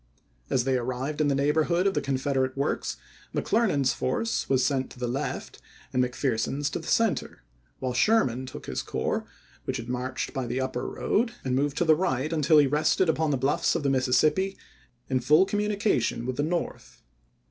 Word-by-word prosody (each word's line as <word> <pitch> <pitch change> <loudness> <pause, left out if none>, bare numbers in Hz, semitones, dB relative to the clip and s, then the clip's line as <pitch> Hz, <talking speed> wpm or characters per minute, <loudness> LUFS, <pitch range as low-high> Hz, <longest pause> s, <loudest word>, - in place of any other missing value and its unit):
As 125 - +2
they 130 0 +1
arrived 130 +5 -3
in 150 - +3
the 140 - +2
neighborhood 155 +6 +2
of 195 - +3
the - - 0
Confederate 130 -1 -1
works 140 +2 -1 0.4
McClernand's 145 - +2
force 225 - -1
was 130 -2 +3
sent 130 -1 0
to - - -14
the 125 0 -2
left 125 +3 -4 0.3
and 125 - +3
McPherson's 130 +2 -1
to - - -3
the - - -10
center; 225 - 0 0.3
while 130 -1 -3
Sherman 130 - +2
took 130 - -9
his - - -3
corps, - - -2 0.4
which - - -2
had 115 +1 -7
marched 125 +1 -3
by 130 -3 -3
the 120 +2 -2
upper 130 0 -2
road, 230 +2 0
and 130 -1 0
moved 145 +2 0
to 175 - +2
the 160 - +6
right 155 -3 0
until 155 0 +4
he 145 - +7
rested 150 +5 +2
upon 160 0 +1
the 140 - +1
bluffs 135 +3 +1
of - - -1
the 140 - +2
Mississippi, 145 +9 +2 0.5
in 130 -1 +1
full 150 +9 +5
communication 205 - 0
with 130 0 -2
the - - +1
North. 170 +3 -4
140 Hz, 185 wpm, -27 LUFS, 130-160 Hz, 0.5 s, he